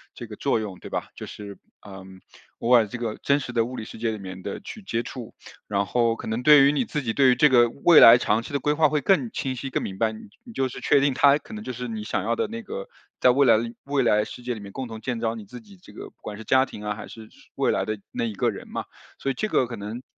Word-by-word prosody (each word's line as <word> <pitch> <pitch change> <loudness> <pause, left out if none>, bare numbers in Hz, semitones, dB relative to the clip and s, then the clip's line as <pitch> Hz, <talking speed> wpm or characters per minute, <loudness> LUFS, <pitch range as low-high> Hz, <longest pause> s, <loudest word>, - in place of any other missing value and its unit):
这 120 - -8
个 105 - -9
作 135 +1 0
用， 100 -4 -6
对 - - -10
吧。 - - -3
就 - - -8
是 100 -1 -9 0.3
呃， 95 -2 -10 0.6
偶 115 - -1
尔 115 -3 +6
这 120 - -6
个 115 -3 -3
真 140 +1 +3
实 125 - -6
的 115 -1 +2
物 125 +2 -7
理 115 - -5
世 - - -10
界 115 - 0
里 110 - -5
面 95 -1 -8
的 - - -5
去 215 +2 -9
接 115 -11 -2
触， 120 -3 -9 0.3
然 100 -1 0
后 115 +2 +1
可 - - -9
能 110 +2 -2
对 145 +1 +7
于 140 - +5
你 145 - 0
自 150 -2 -3
己， 115 -2 -2
对 135 0 +4
于 125 - +4
这 150 +2 +5
个 120 -2 +5
未 155 +7 +5
来 115 +1 +10
长 110 -1 +1
期 - - -10
的 140 - +1
规 150 +2 +1
划 155 -1 +3
会 150 - +1
更 145 - +2
清 130 -1 -3
晰、 135 +2 -5
更 - - -2
明 95 -1 -6
白。 110 -1 +2
你 110 - -10 0.2
你 235 -3 -12
就 135 -8 0
是 - - -9
确 - - +4
定， 140 0 +2
他 140 +2 +5
可 150 +9 -13
能 215 - -7
就 - - -5
是 125 0 -6
你 110 -2 -5
想 100 -3 -2
要 115 +2 0
的 - - -1
那 230 +2 -6
个， 100 - -7 0.3
在 125 - +5
未 140 +2 +3
来 115 -2 +6
的 110 - -1 0.2
未 140 -2 +1
来 105 -2 +3
世 120 +3 -10
界 125 0 -2
里 110 - -8
面， 100 -1 -10
共 130 +4 -5
同 110 -1 -9
建 125 -3 -3
造 115 -1 -1
你 110 -2 -9
自 125 +5 -10
己 100 -3 -17
这 - - -16
个 - - -9
不 - - -46
管 105 - -7
是 110 - -9
家 130 +4 +4
庭 105 - -10
啊， 105 - -1
还 110 - -9
是 110 - -11
是 - - -22
未 - - +1
来 - - 0
的 110 0 -3
那 - - -3
一 110 -3 -4
个 - - +1
人 - - -10
嘛。 - - -5 0.3
所 135 - -2
以 - - -3
这 215 - -2
个 130 - +2
可 115 - -7
能 105 +5 -7
120 Hz, 335 characters per minute, -24 LUFS, 110-135 Hz, 0.6 s, 来